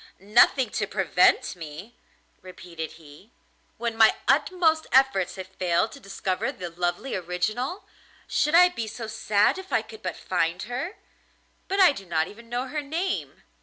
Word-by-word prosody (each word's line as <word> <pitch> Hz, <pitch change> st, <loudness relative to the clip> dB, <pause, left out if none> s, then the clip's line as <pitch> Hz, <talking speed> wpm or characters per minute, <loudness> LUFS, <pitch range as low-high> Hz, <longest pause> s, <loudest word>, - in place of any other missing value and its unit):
'Nothing 215 Hz, +4 st, +4 dB
to 210 Hz, -, -1 dB
prevent 185 Hz, -3 st, +2 dB
me!' 165 Hz, +7 st, -10 dB, 0.5 s
repeated 175 Hz, -3 st, -8 dB
he, 160 Hz, +5 st, -16 dB, 0.5 s
'when 235 Hz, -1 st, -3 dB
my 220 Hz, -1 st, +6 dB
utmost 325 Hz, -4 st, +2 dB
efforts 260 Hz, -8 st, +3 dB
have 190 Hz, -1 st, -6 dB
failed 185 Hz, +2 st, 0 dB
to 280 Hz, -, -11 dB
discover 195 Hz, -4 st, -3 dB
the 175 Hz, -2 st, -7 dB
lovely 175 Hz, +9 st, -2 dB
original. 215 Hz, -, -2 dB, 0.4 s
Should 300 Hz, +2 st, +1 dB
I 360 Hz, +1 st, +8 dB
be 230 Hz, -11 st, -5 dB
so 225 Hz, +1 st, -6 dB
sad 215 Hz, -, +1 dB
if 380 Hz, 0 st, -11 dB
I -, -, +2 dB
could 440 Hz, -, -13 dB
but -, -, -4 dB
find 165 Hz, +3 st, -1 dB
her? 265 Hz, -, -4 dB, 0.7 s
But 390 Hz, +1 st, -1 dB
I 370 Hz, -5 st, +8 dB
do 195 Hz, -9 st, -9 dB
not 160 Hz, -1 st, 0 dB
even 230 Hz, +2 st, -14 dB
know 245 Hz, +2 st, -2 dB
her 300 Hz, +3 st, -3 dB
name. 330 Hz, +6 st, -3 dB
215 Hz, 160 wpm, -25 LUFS, 180-275 Hz, 0.7 s, I